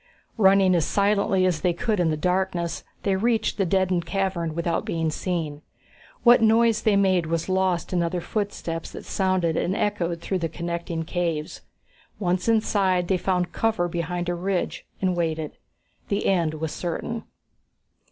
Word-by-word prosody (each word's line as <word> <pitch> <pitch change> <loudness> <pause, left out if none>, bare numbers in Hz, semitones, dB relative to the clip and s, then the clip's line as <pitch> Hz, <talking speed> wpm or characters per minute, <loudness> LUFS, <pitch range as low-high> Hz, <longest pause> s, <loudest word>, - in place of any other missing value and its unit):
Running 195 -2 +5
as 170 -3 +3
silently 200 -2 +2
as 175 -4 +1
they 180 -2 +2
could 210 +3 -1
in 175 -2 +3
the 155 - 0
darkness, 180 0 -1 0.2
they 195 -1 +2
reached 220 +1 0
the 195 - +2
deadend 185 -1 +1
cavern 175 -4 -1
without 170 0 -1
being 165 -1 -1
seen. 155 -4 -3 0.6
What 240 -1 +7
noise 225 0 +4
they 215 -2 +3
made 185 -4 +3
was 165 0 -1
lost 185 -2 0
in 175 - +2
other 170 +1 -1
footsteps 175 -4 -3
that - - -8
sounded 185 -4 +1
and 180 +3 0
echoed 175 -6 -1
through 185 +2 -2
the 165 -1 -2
connecting 170 0 -4
caves. 165 -2 -3 0.6
Once 180 +1 0
inside, 195 -5 +2
they 190 - +3
found 180 -1 0
cover 220 -6 0
behind 175 +1 -3
a 175 - 0
ridge 180 +1 -2 0.2
and 185 -1 +2
waited. 160 -3 -1 0.6
The 200 - -1
end 170 -5 +2
was 155 0 -3
certain. 225 +6 -4
180 Hz, 160 wpm, -25 LUFS, 170-195 Hz, 0.6 s, What